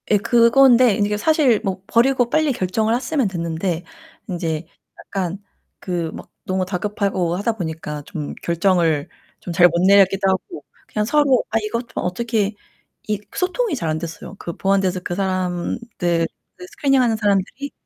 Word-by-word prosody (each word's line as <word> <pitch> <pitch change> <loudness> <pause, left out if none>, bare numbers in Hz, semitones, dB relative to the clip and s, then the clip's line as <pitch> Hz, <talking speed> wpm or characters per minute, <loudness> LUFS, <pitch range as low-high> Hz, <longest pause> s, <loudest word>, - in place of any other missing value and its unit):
예, 210 - +5
그건데 235 +1 +5
이게 210 -1 0
사실 275 -3 +3
뭐 190 -2 -3
버리고 245 +1 +3
빨리 310 +1 +2
결정을 215 +2 0
했으면 270 -2 0
됐는데 170 -1 -2 0.4
인제 165 -4 -3 0.3
약간 190 -1 -4 0.4
그 170 -3 -3
막 - - -10
너무 185 0 -1
다급하고 190 -2 -1
하다 205 +5 0
보니까 160 -6 -5
좀 150 -2 -6
결정을 170 -4 +1 0.3
좀 175 - -6
잘 175 +1 +7
못 170 0 -1
내렸기도 195 0 +5
하고 190 - -3 0.2
그냥 210 -1 -1
서로 280 +1 +3
아 225 - +1
이것 230 +3 -3
어떻게 215 +2 -1 0.5
이 210 -1 -1 0.2
소통이 375 +1 0
잘 165 -10 -3
안 155 0 -1
됐어요. 170 +3 -8
그 170 - -5
보안대서 190 -2 +1
그 175 - -4
사람들 180 -1 -1 0.3
그 180 - -10
스크리닝 270 +5 +2
하는 235 -3 +2
사람들이 210 +6 -1
195 Hz, 310 characters per minute, -21 LUFS, 175-235 Hz, 0.5 s, 잘